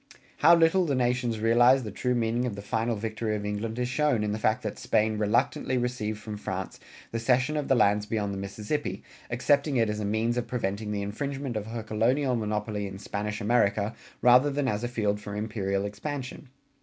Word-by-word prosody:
How 170 +3 +7
little 170 +3 +4
the 145 -4 0
nations 125 -2 0
realized 120 +4 +5
the 105 - -5
true 125 +5 -1
meaning 120 +1 0
of 110 - -4
the 100 - -8
final 115 +2 -1
victory 110 0 -2
of 105 -1 -4
England 105 +2 -3
is 125 0 0
shown 130 -3 +1
in 105 - -1
the 105 - -2
fact 110 +3 +1
that 105 - -4
Spain 110 0 +1
reluctantly 110 +4 +1
received 120 -3 -2
from 105 0 -7
France - - -5 0.3
the 115 - -2
cession 125 +5 +2
of 150 -2 -1
the 135 - +4
lands 105 -2 +3
beyond 105 -3 -1
the 100 - -4
Mississippi, 105 +9 -3 0.3
accepting 140 +3 +2
it 115 -2 +2
as 105 - -4
a - - -2
means 110 +4 0
of 120 - -2
preventing 105 -3 -2
the 100 -1 -2
infringement 135 +4 -4
of 105 0 -3
her 115 0 -5
colonial 125 +5 +1
monopoly 105 -2 -2
in 95 0 -8
Spanish 105 +1 -4
America 105 -1 +2 0.3
rather 125 +4 +6
than 140 -1 -1
as 105 -2 -1
a - - 0
field 105 -4 -1
for 105 -1 -7
imperial 100 -2 -2
expansion. 130 +6 -6
115 Hz, 205 wpm, -27 LUFS, 105-125 Hz, 0.3 s, How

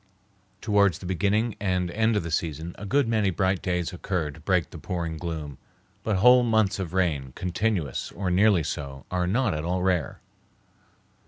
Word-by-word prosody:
Towards 100 -3 +3
the - - -11
beginning 100 +5 0
and 90 -3 0
end 110 +3 +2
of 105 - 0
the 85 - -5
season 80 +1 -2
a 100 - -6
good 140 +2 +2
many 110 -3 +2
bright 95 0 0
days 90 -2 -1
occur 90 -4 -2
to 75 - -14
break 85 +1 0
the - - -9
pouring 85 -3 -3
gloom, 80 -5 -5 0.4
but 110 - 0
whole 125 +6 +7
months 110 -4 +2
of 90 -4 -4
rain, 75 -8 0
continuous, 90 - -2
or 95 -2 -2
nearly 95 -1 +4
so, 70 -2 -5
are 90 -1 0
not 115 +3 +1
at 75 0 -3
all 90 +2 -1
rare. 90 -6 0
90 Hz, 175 wpm, -26 LUFS, 85-105 Hz, 0.4 s, whole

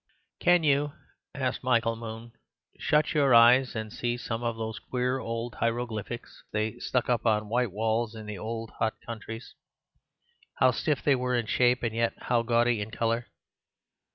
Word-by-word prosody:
"Can 175 -1 +4
you," 145 0 +2 0.4
asked 130 -2 -2
Michael, 115 -1 -1 0.5
"shut 150 0 +2
your 140 -5 +4
eyes 125 +3 +6
and 110 -1 -4
see 120 0 -2
some 115 -1 -4
of 115 -1 -2
those 110 -2 -4
queer 125 +3 -1
old 115 0 -4
hieroglyphics 115 -1 -3
they 110 0 -2
stuck 125 -2 0
up 120 -2 +1
on 105 -1 +1
white 120 -1 +1
walls 110 +2 -1
in 110 -1 -8
the 105 -3 -6
old 115 +1 -5
hot 110 -1 +1
countries. 115 0 -7 1.0
How 130 +1 +4
stiff 145 +3 -1
they 145 - +4
were 125 -1 0
in 120 -2 0
shape 125 +3 +2
and 115 -2 -1
yet 115 0 +1
how 120 -1 +1
gaudy 115 -1 +2
in 105 - -4
colour. 115 +1 -1
115 Hz, 160 wpm, -28 LUFS, 110-125 Hz, 1.0 s, eyes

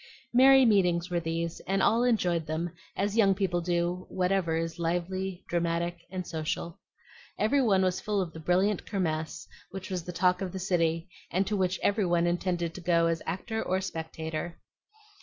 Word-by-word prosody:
Merry 265 +1 +7
meetings 180 -5 +3
were 175 - +1
these; 165 0 -3
and 195 +1 +1
all 230 +2 +4
enjoyed 180 -9 +1
them, 160 +2 -2 0.3
as 200 +1 0
young 200 -4 +4
people 180 -3 0
do 175 +1 -1
whatever 180 -3 +1
is 165 0 -3
lively, 180 +2 -2
dramatic, 170 0 -1
and 185 -1 -4
social. 165 +1 -4 0.6
Every 275 +6 +3
one 195 -6 +3
was 185 -1 0
full 210 -1 -1
of 175 -4 -2
the 160 - -8
brilliant 185 +5 +1
Kirmess, 160 -4 -2 0.2
which 195 0 -7
was 180 -2 -2
the 180 - -6
talk 180 +1 +2
of 190 -2 -3
the - - -4
city, 170 -3 0 0.2
and 190 +3 +1
to 210 - -1
which 185 -1 0
every 205 -2 +2
one 175 0 +2
intended 175 -1 -1
to 185 - -8
go 170 -1 +3
as 165 -1 0
actor 220 +4 -3
or 185 +1 0
spectator. 160 -2 -5
180 Hz, 175 wpm, -29 LUFS, 170-190 Hz, 0.6 s, Merry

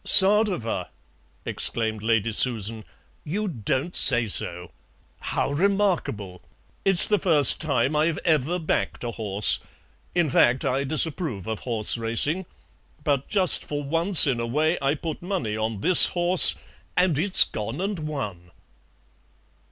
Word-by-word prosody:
"Sadowa!" 195 - +3 0.6
exclaimed 110 -2 -3
Lady 115 0 -1
Susan; 110 -1 -1 0.4
"you 205 +8 -5
don't 140 - -4
say 120 -3 +3
so! 90 -4 -4 0.5
How - - -4
remarkable! 170 - -3 0.4
It's 195 -3 +8
the 210 -1 0
first 150 -7 +4
time 140 -2 -2
I've 155 +1 -1
ever 160 +1 -1
backed 160 -6 -4
a 120 - -5
horse; 105 -3 -1 0.6
in 175 -2 0
fact 125 +1 +1
I 135 +1 -2
disapprove 150 - -2
of 110 -1 -6
horse 115 -1 -2
racing, 145 +11 -1 0.6
but 140 -3 -2
just 190 -4 +3
for 145 0 -6
once 165 +5 +2
in 130 -5 -2
a 115 - -4
way 155 +7 -1
I 140 +2 -1
put 160 +1 -8
money 175 - -5
on 110 -1 -5
this 180 0 +8
horse, 175 0 +3 0.4
and 180 -3 +1
it's 190 +3 +8
gone 110 +7 -7
and 195 -1 -4
won." 105 - -7
145 Hz, 135 wpm, -22 LUFS, 115-175 Hz, 0.6 s, It's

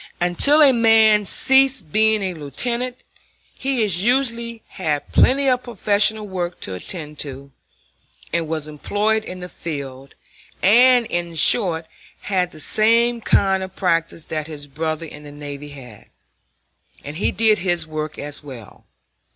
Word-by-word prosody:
Until 280 - +3
a 275 -2 +6
man 220 -3 +4
ceased 265 - +4
being 220 +1 +2
a 185 -1 -2
lieutenant 235 - -3 0.6
he 265 -3 -2
usually 235 +3 -1
had 150 -6 -4
plenty 275 +2 +3
of 250 -1 +2
professional 215 -2 0
work 180 -2 -5
to 95 - -4
attend 150 - -6
to 140 -1 -5 0.8
and 170 -1 0
was 155 -1 -4
employed 205 +8 -1
in 185 -3 -9
the 180 - -7
field, 140 -6 -8 0.5
and, 245 +4 +5
in 170 -4 -4
short, 165 -1 +3 0.4
had 185 -3 -1
the 155 - -12
same 230 +7 +2
kind 195 -2 +2
of 190 0 -8
practice 165 -3 -1
that 155 -1 -5
his 150 -2 -7
brother 155 +3 -4
in 150 -1 -11
the 145 -1 -12
navy 145 0 -9
had, 125 -7 -13 1.0
and 145 +2 -8
he 195 - 0
did 220 -1 +3
his 175 -3 0
work 155 -1 -6
as 145 0 -5
well. 125 -7 -12
180 Hz, 145 wpm, -20 LUFS, 150-225 Hz, 1.0 s, a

